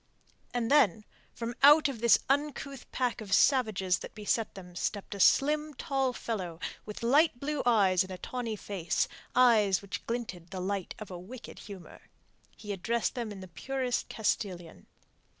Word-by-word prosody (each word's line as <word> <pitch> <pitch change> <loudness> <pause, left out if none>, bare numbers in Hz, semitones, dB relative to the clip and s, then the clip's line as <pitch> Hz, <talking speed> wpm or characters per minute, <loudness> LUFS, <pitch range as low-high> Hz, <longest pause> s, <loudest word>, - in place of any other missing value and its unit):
And 240 -1 -1
then, 220 - +4 0.3
from 235 0 -5
out 295 +2 +8
of 255 -5 -5
this 235 -1 +6
uncouth 280 -1 -2
pack 250 -3 -1
of 200 -2 -4
savages 205 -6 +3
that - - -10
beset 215 +1 -1
them, 180 -2 -11
stepped 205 +3 -3
a 200 - -7
slim, 300 +7 +3
tall 270 0 0
fellow 185 -9 -4 0.3
with 210 +2 -7
light 280 +2 +4
blue 295 +1 -2
eyes 195 -6 +4
in 185 - -11
a 185 - -5
tawny 235 +2 -4
face, 190 -5 -1 0.3
eyes 220 -6 +5
in - - -10
which 200 - -5
glinted 220 -8 -4
the 190 - -6
light 190 0 -3
of 215 -3 -9
a 180 - -6
wicked 225 +7 -10
humour. 195 -4 -11 0.6
He 210 -1 -5
addressed 230 +4 -1
them 235 -4 -4
in 195 -2 -8
the 185 - -9
purest 255 +8 -3
Castilian. 185 -6 -3
220 Hz, 170 wpm, -30 LUFS, 190-255 Hz, 0.6 s, out